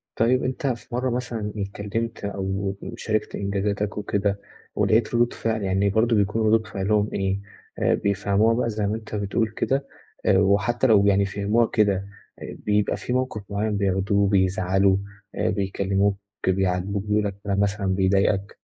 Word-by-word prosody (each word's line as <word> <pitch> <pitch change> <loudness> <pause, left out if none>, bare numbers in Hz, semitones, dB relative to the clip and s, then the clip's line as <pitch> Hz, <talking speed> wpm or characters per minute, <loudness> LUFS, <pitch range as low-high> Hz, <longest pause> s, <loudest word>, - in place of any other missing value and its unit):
طيب 125 +3 +2
أنت 135 +3 -2
في 120 -1 -4
مرّة 130 +1 0
مثلًا 120 -4 -3
اتكلِّمت 105 +3 -4
أو 95 0 -2 0.2
شاركت 110 -2 -2
إنجازاتك 100 +1 -2
وكده 100 -1 -1 0.4
ولقيت 110 +1 +2
ردود 120 0 +2
فعل 110 -2 -2
يعني 95 +1 +1
برضه 115 +3 +2
بيكون 105 +2 +1
ردود 110 0 +3
فِعلهم 105 +1 0
إيه، 95 0 -1 0.4
آآ - - +3
بيفهموها 100 +2 +2
بقى 115 0 0
زي 105 -2 -1
ما 105 - -1
أنت 110 -1 -7
بتقول 105 +2 0
كده 135 +5 -1 0.4
آآ 95 - +5
وحتّى 100 +6 +2
لو 100 -3 +5
يعني 100 0 +4
فهموها 100 +4 +1
كده 105 -2 +2 0.5
آآ - - -7
بيبقى 105 0 +1
في 125 - -4
موقِف 130 -4 -1
معيّن 105 +1 -1
بياخدوه 100 +1 +1
بيزعلوا، 95 0 +2 0.4
آآ - - 0
بيكلِّموك، 100 0 0 0.3
بيعاتبوك 95 +1 0
بيقولوا 105 0 +1
لك 100 - -9
كلام 100 -1 -1
مثلًا 100 0 0
بيضايقك؟ 95 +1 +1
100 Hz, 155 wpm, -24 LUFS, 100-110 Hz, 0.5 s, آآ